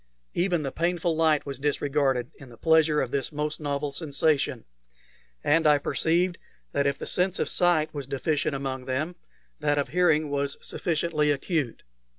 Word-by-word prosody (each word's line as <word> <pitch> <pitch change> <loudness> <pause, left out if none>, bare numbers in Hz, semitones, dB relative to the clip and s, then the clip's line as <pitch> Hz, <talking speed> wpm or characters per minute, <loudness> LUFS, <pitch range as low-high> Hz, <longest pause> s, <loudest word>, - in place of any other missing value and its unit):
Even 175 -3 +1
the 135 - -3
painful 170 -1 0
light 155 -2 +3
was 140 -2 -5
disregarded 140 -3 0
in 135 - -12
the 120 - -14
pleasure 160 0 +4
of 125 - -3
this 140 +1 -1
most 150 0 -3
novel 145 -1 -2
sensation, 140 -4 0 0.8
and 160 +2 +3
I 150 -1 +6
perceived 170 +4 0 0.3
that 140 0 +1
if 140 0 0
the - - -6
sense 185 +1 +1
of - - 0
sight 175 -4 +2
was 140 -3 -5
deficient 145 +1 -1
among 135 -2 -4
them, 145 +7 -2 0.4
that 145 -1 +1
of 140 - 0
hearing 155 -4 +2
was 140 0 -1
sufficiently 155 -2 0
acute. 145 -3 -1
150 Hz, 165 wpm, -26 LUFS, 140-160 Hz, 0.8 s, I